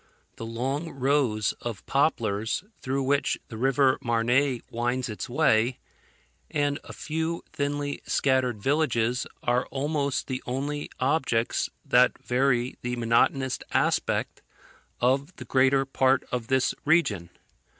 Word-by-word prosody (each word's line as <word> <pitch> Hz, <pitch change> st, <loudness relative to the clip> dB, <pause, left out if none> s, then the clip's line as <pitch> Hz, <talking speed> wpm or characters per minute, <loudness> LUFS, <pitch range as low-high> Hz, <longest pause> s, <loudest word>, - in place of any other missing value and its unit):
The 115 Hz, -, -6 dB
long 135 Hz, +8 st, -2 dB
rows 130 Hz, -6 st, +1 dB
of 115 Hz, -5 st, -6 dB
poplars, 115 Hz, -, 0 dB, 0.2 s
through 135 Hz, +1 st, -1 dB
which 140 Hz, +1 st, +1 dB
the 115 Hz, -, -7 dB
river 135 Hz, +2 st, +3 dB
Marne 120 Hz, +3 st, +1 dB
winds 120 Hz, +1 st, -1 dB
its 105 Hz, -, -5 dB
way, 120 Hz, -3 st, +2 dB, 0.7 s
and 145 Hz, -1 st, 0 dB
a -, -, -10 dB
few 160 Hz, +2 st, -3 dB
thinly 145 Hz, 0 st, -2 dB
scattered 130 Hz, -4 st, +1 dB
villages, 125 Hz, -5 st, +1 dB, 0.2 s
are 120 Hz, +1 st, +1 dB
almost 140 Hz, 0 st, -1 dB
the 130 Hz, -1 st, -4 dB
only 145 Hz, +4 st, -3 dB
objects 130 Hz, -4 st, +1 dB, 0.2 s
that 125 Hz, +1 st, +4 dB
vary 125 Hz, 0 st, 0 dB
the 125 Hz, 0 st, -2 dB
monotonous 125 Hz, +3 st, +2 dB
aspect -, -, 0 dB, 0.6 s
of 135 Hz, +7 st, +1 dB
the -, -, -9 dB
greater 135 Hz, +1 st, +3 dB
part 135 Hz, 0 st, +2 dB
of 120 Hz, -2 st, -2 dB
this 130 Hz, 0 st, +2 dB
region. 115 Hz, -, +2 dB
130 Hz, 120 wpm, -27 LUFS, 120-140 Hz, 0.7 s, that